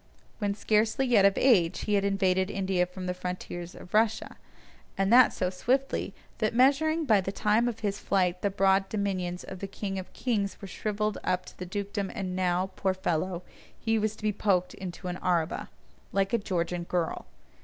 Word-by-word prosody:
When 205 -2 0
scarcely 215 +4 +2
yet 225 -6 +5
of 200 - +4
age 190 -10 +4
he 210 - -1
had 200 -1 +3
invaded 190 -1 +2
India 190 -3 0
from 185 +1 -8
the 180 - -1
frontiers 180 -1 -6
of 180 - -13
Russia, 220 0 +1 0.6
and 195 +3 +2
that 250 0 +8
so 185 -1 -1
swiftly, 260 +8 -1 0.2
that 215 +1 0
measuring 310 +6 +3
by 215 -7 +4
the 190 - -3
time 215 +3 +2
of 235 -2 -4
his 200 -2 -1
flight 180 -2 +1
the 200 - +1
broad 195 0 +2
dominions 185 -4 -2
of 190 - -8
the 195 - -4
king 195 0 -4
of 185 - -9
kings 215 -5 -1
were 200 - -8
shrivelled 210 +1 -2
up 185 0 0
to - - -11
a 180 - -4
dukedom 200 +1 -3
and 185 -4 -3
now, 185 0 0
poor 190 -1 0
fellow, 180 0 -1 0.4
he 225 -1 +1
was 215 0 -1
to - - -16
be 210 -1 +1
poked 190 -3 +1
into 185 0 -7
an 180 0 -3
araba: 175 -4 -1 0.4
like 195 +1 0
a 235 - +3
Georgian 175 -3 -2
girl! 170 -1 -2
195 Hz, 190 wpm, -28 LUFS, 185-215 Hz, 0.6 s, that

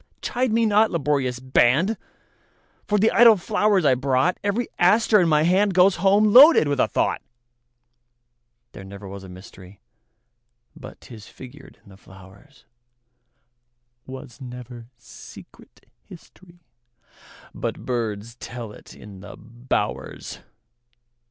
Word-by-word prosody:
Chide 250 -1 -2
me 230 +1 +1
not, 215 +1 +2
laborious 140 -5 -2
band, 130 - +1 0.9
For 210 - 0
the 220 +2 +2
idle 230 -2 +6
flowers 205 -2 0
I 135 - +4
brought; 130 +5 -1
Every 205 +4 -2
aster 210 +3 +3
in 170 - +1
my 150 -1 +2
handGoes 185 +1 +2
home 205 +3 +2
loaded 275 - +7
with 145 -2 -2
a - - +2
thought. - - -2 1.5
There - - -12
was 95 - -13
never 100 0 -11
mysteryBut 95 0 -13 1.2
'tis 110 -4 -14
figured 135 +2 -15
in - - -20
the 95 - -16
flowers; 95 +8 -19 1.4
SWas 130 0 -11
never 125 -2 -11
secret 115 - -16 0.2
historyBut 165 -10 -13
birds 115 -2 -5
tell 120 -3 -9
it - - -15
in 100 -2 -14
the - - -12
bowers. 120 +2 -6
135 Hz, 115 wpm, -22 LUFS, 115-195 Hz, 1.5 s, loaded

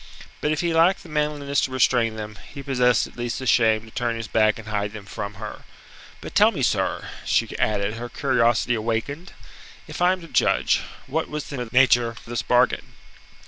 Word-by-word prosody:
But 150 - +1
if 155 - 0
he 170 -1 0
lacked 170 +4 +3
the 170 - -13
manliness 150 -2 0
to 130 - -1
restrain 120 -3 +2
them, 105 -1 -7
he 140 -1 -8
possessed 125 -4 +2
at - - -14
least 120 -1 -3
the 130 - -5
shame 110 -2 +3
to 110 - -15
turn 120 0 -1
his 115 -1 -5
back 110 -1 +2
and 110 -1 -11
hide 105 0 -2
them 105 -2 -9
from 100 -1 -6
her. 105 +1 -8 0.6
"But - - -8
tell - - +6
me, - - -3
sir," - - 0 0.2
she - - 0
added, 105 +1 0
her 120 +1 -6
curiosity 120 -3 +1
awakened, 115 - -3 0.5
"if - - -7
I 180 +1 +5
am 185 -1 -2
to 165 - -10
judge, - - +2 0.2
what 160 +4 -2
was 150 -1 -5
the 125 -4 -4
nature 125 -1 +5
of 115 -1 -9
this 120 -1 -3
bargain?" 125 +1 +1
120 Hz, 200 wpm, -23 LUFS, 110-140 Hz, 0.6 s, tell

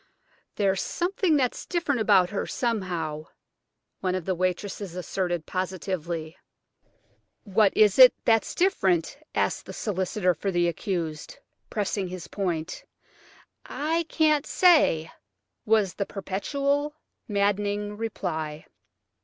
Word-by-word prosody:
"There's 195 -2 +1
something 355 -2 0
that's 255 -4 0
different 315 -9 0
about 185 -4 +4
her 200 - -2
somehow," 175 -10 -2 0.7
one 185 -1 -1
of 185 -3 -4
the 190 - 0
waitresses 185 +1 -3
asserted 175 -2 -2
positively. 175 -3 -4 1.1
"What 205 -1 +3
is 210 +1 +5
it 255 -1 +11
that's 225 -1 +2
different?" 195 - +1 0.2
asked - - 0
the - - -7
solicitor 190 -2 0
for 185 +5 -3
the 175 -2 +2
accused, 170 -4 -3 0.3
pressing 200 -2 -2
his 180 -1 -7
point. 180 -4 -3 0.8
"I 325 +3 -1
can't 305 -2 +2
say," 300 - +4 0.6
was 210 -4 +3
the 200 - -3
perpetual, 280 +10 -2 0.3
maddening 205 0 0
reply. 160 -8 -4
195 Hz, 110 wpm, -26 LUFS, 175-225 Hz, 1.1 s, it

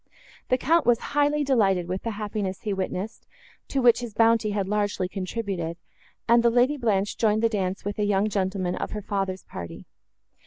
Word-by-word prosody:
The 255 - +3
Count 325 +4 +2
was 240 -1 +5 0.2
highly 290 +1 +2
delighted 195 -10 +2
with 185 +1 -3
the 230 - -3
happiness 205 -3 -3
he 210 - -2
witnessed, 190 +3 -4 0.4
to 270 -2 -1
which 240 -2 +6
his 235 -4 -7
bounty 225 -1 +4
had 200 -2 -1
largely 205 -2 0
contributed, 185 -3 -4 0.5
and 235 +1 +5
the 235 - +4
Lady 245 +5 +3
Blanche 210 -6 0
joined 215 0 +2
the 230 - +4
dance 195 -3 -2
with 205 +1 -4
a - - +2
young 205 0 +2
gentleman 190 -3 -1
of - - -4
her 210 -1 -5
father's 195 -2 -2
party. 85 -1 -8
210 Hz, 185 wpm, -25 LUFS, 190-235 Hz, 0.5 s, which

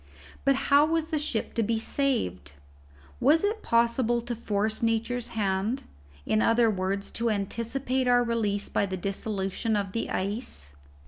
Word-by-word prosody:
But 275 0 +5
how 280 +2 +4
was 325 0 0
the 310 - 0
ship 250 -6 -2
to 230 - 0
be 225 +1 +1
saved? 220 - -1 0.7
Was 310 +7 +4
it 430 +2 0
possible 235 +1 +2
to 240 0 -3
force 215 -1 -1
Nature's 230 +1 0
hand; 200 +4 0 0.4
in 215 - +2
other 230 0 +4
words, 195 +1 -2
to 235 0 0
anticipate 235 +5 -1
our 245 0 +5
release 215 -4 -1
by 200 - 0
the 190 0 -3
dissolution 195 +3 -2
of 200 -2 -1
the 230 - -3
ice? 190 - -2
230 Hz, 150 wpm, -27 LUFS, 200-250 Hz, 0.7 s, But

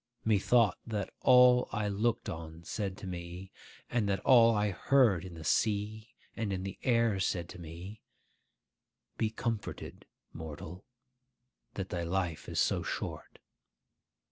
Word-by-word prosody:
Methought 110 0 +3
that 105 -4 -3
all 125 0 +6
I 105 -1 -1
looked 105 +3 0
on 80 0 -7
said 95 0 -4
to - - -9
me, 90 +1 -7 0.4
and 110 -4 0
that 95 -1 +1
all 115 -3 +6
I 105 0 +1
heard 105 -2 +3
in 90 -2 -9
the 80 - -9
sea 110 +5 0 0.2
and 110 -3 -2
in 95 -1 -2
the 95 -1 -6
air 115 -5 +2
said 85 -2 -1
to - - -10
me, 85 +6 -9 1.2
'Be 110 - +2
comforted, 115 -1 -5 0.3
mortal, 80 +3 -8 0.9
that 95 -1 -4
thy 85 - -3
life 85 -1 -2
is - - -2
so - - +2
short. - - -5
100 Hz, 140 wpm, -31 LUFS, 90-110 Hz, 1.2 s, all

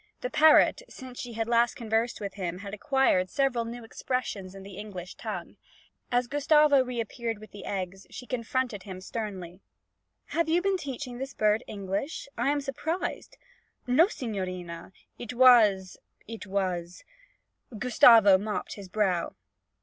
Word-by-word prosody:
The 250 - -3
parrot, 310 +9 +5
since 255 -1 -10
she 245 -2 -6
had 225 0 -2
last 235 0 +3
conversed 225 +1 -1
with 200 -2 -5
him, 180 -3 -4
had 200 - -7
acquired 215 -5 +2
several 255 0 0
new 235 +1 -7
expressions 220 -5 -4
in 195 - -10
the 195 -1 -10
English 190 -3 -8
tongue. - - -7 0.5
As 245 0 +2
Gustavo 290 +1 +4
reappeared 235 -2 -4
with 215 +1 -13
the 205 - -10
eggs, 190 -1 -5
she 250 - -9
confronted 250 -3 -2
him 185 -1 -8
sternly. 190 -4 -6 0.7
'Have 335 -1 0
you 335 +2 +4
been 390 +1 +1
teaching 260 -5 -6
this 270 +1 -6
bird 215 +2 +2
English? 200 +10 -4
I 240 +4 0
am 290 0 +1
surprised!' 315 +5 -4 0.5
'No, 260 +8 +5
signorina. 185 - -5 0.3
It 240 +1 -6
was 215 -7 +5 0.3
it 225 -2 -8
was 180 -3 -3 0.4
' 225 - -16
Gustavo 225 -4 +6
mopped 210 +1 -4
his 195 -2 -10
brow. 185 -4 0
225 Hz, 150 wpm, -28 LUFS, 195-255 Hz, 0.7 s, Gustavo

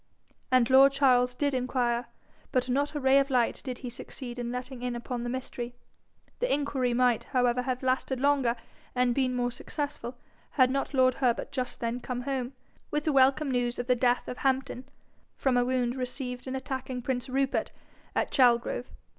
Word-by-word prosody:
And 255 -2 +4
lord 270 +1 +7
Charles 250 -3 +3
did 285 +1 0
inquire; 250 -1 0 0.4
but 255 -1 +1
not 285 +4 0
a - - 0
ray 265 0 +5
of 275 0 0
light 245 -3 +1
did 255 -2 -4
he - - -3
succeed 245 0 -7
in 240 0 -3
letting 250 0 -6
in 245 -1 -2
upon 240 0 -4
the 240 - -3
mystery. 245 -1 -5 0.6
The - - 0
inquiry 275 -3 0
might, 240 -1 +2
however, 250 -2 +1
have 255 0 -3
lasted 260 0 0
longer 270 -4 +2 0.4
and 250 -1 +3
been 255 -1 +1
more 245 0 0
successful, 285 -3 -5 0.4
had 255 -2 +4
not 275 +1 -2
lord 255 -1 +5
Herbert 245 -2 +1
just 255 -2 -4
then 235 +1 -1
come 250 0 -4
home, 260 -1 -3 0.4
with 300 0 -1
the 305 - +1
welcome 275 +2 +4
news 245 -1 0
of 245 - -3
the 250 0 +3
death 245 0 +1
of 250 - -5
Hampden, 265 -1 -1 0.5
from 265 -2 +1
a 245 - +4
wound 250 -1 0
received 250 0 -5
in 260 - -3
attacking 260 -1 -4
prince 255 0 -2
Rupert 270 +1 0 0.5
at - - 0
Chalgrove. 245 -1 +3
255 Hz, 180 wpm, -28 LUFS, 245-270 Hz, 0.6 s, lord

